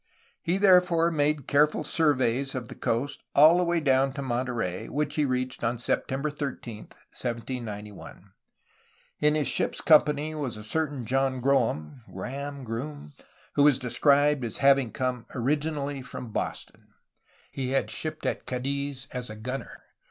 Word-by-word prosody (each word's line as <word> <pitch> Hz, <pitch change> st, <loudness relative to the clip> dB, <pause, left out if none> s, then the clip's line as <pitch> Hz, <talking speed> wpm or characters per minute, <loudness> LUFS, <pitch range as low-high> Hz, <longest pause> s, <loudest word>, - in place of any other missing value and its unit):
He 175 Hz, +3 st, 0 dB
therefore 180 Hz, -4 st, +5 dB
made 150 Hz, -3 st, +1 dB
careful 150 Hz, +1 st, +3 dB
surveys 135 Hz, -4 st, +1 dB
of 125 Hz, -3 st, -5 dB
the -, -, -7 dB
coast 125 Hz, +5 st, -2 dB
all 155 Hz, +5 st, +7 dB
the -, -, +3 dB
way 170 Hz, -1 st, +1 dB
down 135 Hz, -2 st, +2 dB
to 140 Hz, 0 st, -5 dB
Mon 125 Hz, 0 st, -1 dB
terey, 115 Hz, -8 st, -3 dB
which 145 Hz, +1 st, -1 dB
he 150 Hz, -, +1 dB
reached 130 Hz, -1 st, -2 dB
on 120 Hz, +1 st, 0 dB
September 135 Hz, +4 st, -1 dB
13, 130 Hz, -7 st, -6 dB, 0.2 s
1791. 110 Hz, -5 st, -6 dB, 0.9 s
In 150 Hz, 0 st, +3 dB
his 150 Hz, -2 st, +1 dB
ship's -, -, 0 dB
company 150 Hz, -1 st, +4 dB
was 140 Hz, -8 st, -4 dB
a 105 Hz, -, -9 dB
certain 145 Hz, +1 st, -2 dB
^'JohnGroem'' 130 Hz, -, 0 dB
(Graham? 140 Hz, +9 st, -6 dB
Groom?), 120 Hz, -, -6 dB, 0.4 s
who -, -, +2 dB
was 145 Hz, -2 st, +6 dB
described 140 Hz, +2 st, +3 dB
as 115 Hz, -, -3 dB
having 135 Hz, -4 st, +4 dB
come 125 Hz, -2 st, -3 dB
originally 145 Hz, +2 st, -1 dB
from 125 Hz, -3 st, -8 dB
"Boston/' -, -, -4 dB, 0.6 s
he 130 Hz, -2 st, -3 dB
had 135 Hz, 0 st, 0 dB
shipped 155 Hz, 0 st, -2 dB
at -, -, -2 dB
Cadiz 140 Hz, +1 st, -2 dB
as 125 Hz, -2 st, -4 dB
a 110 Hz, -, -7 dB
gunner. 125 Hz, +5 st, -6 dB
135 Hz, 145 wpm, -27 LUFS, 125-150 Hz, 0.9 s, all